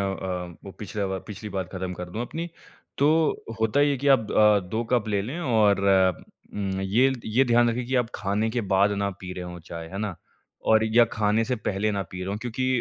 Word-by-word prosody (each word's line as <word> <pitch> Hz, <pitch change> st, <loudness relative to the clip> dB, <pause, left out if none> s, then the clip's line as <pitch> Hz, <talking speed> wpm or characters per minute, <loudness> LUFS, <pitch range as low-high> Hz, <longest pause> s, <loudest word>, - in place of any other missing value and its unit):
अ, 90 Hz, -3 st, -3 dB
वो 100 Hz, -, -7 dB
पिछला 105 Hz, -1 st, -3 dB
बा 95 Hz, 0 st, -2 dB
पिछली 105 Hz, +1 st, -7 dB
बार 95 Hz, -1 st, -2 dB
खत्म 95 Hz, -1 st, -4 dB
कर 90 Hz, 0 st, -7 dB
दूँ 110 Hz, +6 st, -3 dB
अपनी। 165 Hz, +7 st, -5 dB, 0.5 s
तो 140 Hz, -, +4 dB, 0.5 s
होता 110 Hz, +5 st, +2 dB
ये 145 Hz, 0 st, +4 dB
है 140 Hz, -, +1 dB
कि 140 Hz, +2 st, 0 dB
आप 120 Hz, -6 st, +4 dB
अ, 105 Hz, -1 st, +5 dB
2 110 Hz, +5 st, -1 dB
कप 120 Hz, -3 st, +2 dB
ले 100 Hz, -2 st, +1 dB
लें 130 Hz, -, -5 dB
और 110 Hz, -, +3 dB, 0.7 s
उम, 95 Hz, -2 st, -2 dB
ये 115 Hz, +8 st, +3 dB
ये 120 Hz, +5 st, +2 dB
ध्यान 120 Hz, -1 st, +4 dB
रखें 120 Hz, +1 st, -2 dB
कि 130 Hz, -, -3 dB
आप 120 Hz, -2 st, +1 dB
खाने 105 Hz, +3 st, -1 dB
के 120 Hz, +1 st, -1 dB
बाद 100 Hz, +2 st, +4 dB
ना 100 Hz, -, 0 dB
पी 90 Hz, -1 st, -6 dB
रहे 90 Hz, 0 st, -6 dB
हों 90 Hz, 0 st, -7 dB
चाय, 85 Hz, 0 st, -8 dB
है 95 Hz, -, -6 dB
ना? 105 Hz, -3 st, -3 dB, 0.5 s
और 110 Hz, 0 st, +4 dB
या 115 Hz, +2 st, +5 dB
खाने 110 Hz, +1 st, +2 dB
से 125 Hz, +1 st, -1 dB
पहले 105 Hz, 0 st, -1 dB
ना 100 Hz, -1 st, -1 dB
पी 90 Hz, -, -7 dB
रहे 90 Hz, -, -4 dB
हों 100 Hz, -, -2 dB
क्योंकि 125 Hz, +3 st, -3 dB
105 Hz, 230 wpm, -25 LUFS, 95-120 Hz, 0.7 s, अ